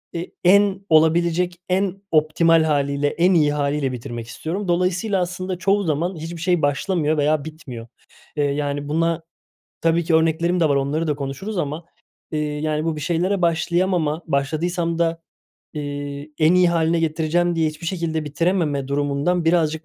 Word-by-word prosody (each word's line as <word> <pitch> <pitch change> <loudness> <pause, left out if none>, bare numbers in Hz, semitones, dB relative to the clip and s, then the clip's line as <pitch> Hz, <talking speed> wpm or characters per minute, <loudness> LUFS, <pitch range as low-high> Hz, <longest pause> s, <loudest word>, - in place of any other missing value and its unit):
e 170 +1 -3 0.2
en 195 +1 +4
olabilecek 170 +3 +3
en 195 +1 0
optimal 160 +1 +4
hâliyle, 140 -2 +1
en 175 +5 +2
iyi 150 -4 +3
hâliyle 145 -1 0
bitirmek 120 -1 -6
istiyorum. 180 - -4
Dolayısıyla 180 +3 +1
aslında 180 +1 -3
çoğu 200 +3 +1
zaman 170 +3 -1
hiçbir 165 +1 -7
şey 175 -1 +1
başlamıyor 155 +2 0
veya 150 0 +1
bitmiyor. 135 -7 -9 0.5
Eee, 145 - +2
yani, 145 0 -2
buna 165 +2 0 0.6
tabii 165 +1 +2
ki 165 0 +1
örneklerim 165 +2 +2
de 160 - +3
var, 140 - +2
onları 145 +4 0
da 150 - +1
konuşuruz 145 +9 -5
ama, 155 +1 -3 0.5
eee, 155 - -1
yani, 150 +1 -2
bu 165 -1 -1
bir - - -5
şeylere 180 +4 0
başlayamama, 170 -1 +1
başladıysam 165 +4 -1
da, 165 0 0 0.5
eee, 145 0 -5
en 160 +2 +4
iyi 180 -1 +5
hâline 165 0 +1
getireceğim 165 +2 +1
diye 160 -1 +2
hiçbir 155 +2 -8
şekilde 165 -3 -2
bitirememe 150 -2 0
durumundan 145 +5 0
birazcık 160 -1 +1
160 Hz, 155 wpm, -21 LUFS, 150-175 Hz, 0.6 s, iyi